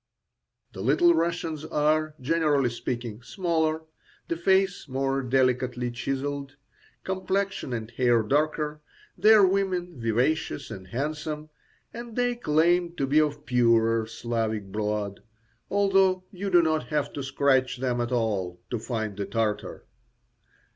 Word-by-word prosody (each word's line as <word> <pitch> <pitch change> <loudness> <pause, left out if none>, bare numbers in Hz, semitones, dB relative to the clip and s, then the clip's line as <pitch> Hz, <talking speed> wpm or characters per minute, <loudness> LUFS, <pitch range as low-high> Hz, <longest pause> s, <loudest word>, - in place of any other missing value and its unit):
The 95 - -7
Little 155 - +4
Russians 165 -2 -1
are, 155 0 +1
generally 145 -3 +2
speaking, 120 -1 -4
smaller, 160 - -1 0.5
the 170 - 0
face 190 +1 +1
more 135 +1 -1
delicately 125 -1 +1
chiselled, 140 +3 -3 0.5
complexion 190 -3 -2
and 115 -1 -4
hair 120 -3 +3
darker, 150 +4 0 0.3
their 215 -2 +6
women 185 -4 -1
vivacious 125 +5 0
and 95 -1 -8
handsome, 150 - -4 0.4
and 235 -1 -8
they 245 0 +1
claim 175 -4 +2
to 140 - 0
be 145 +3 +3
of 150 -1 -2
purer 115 -2 +3
Slavic 110 -3 -3
blood, 105 -1 -2 0.5
although 195 -2 +3
you 195 0 -4
do 175 -2 +5
not 155 -1 0
have 150 -2 -1
to 140 - -4
scratch 135 -1 +1
them 125 -1 -1
at 120 +1 -2
all 100 -7 -1
to 120 - -1
find 110 -3 -3
the 100 -1 -3
Tartar. 105 0 -2
140 Hz, 125 wpm, -26 LUFS, 120-170 Hz, 0.5 s, their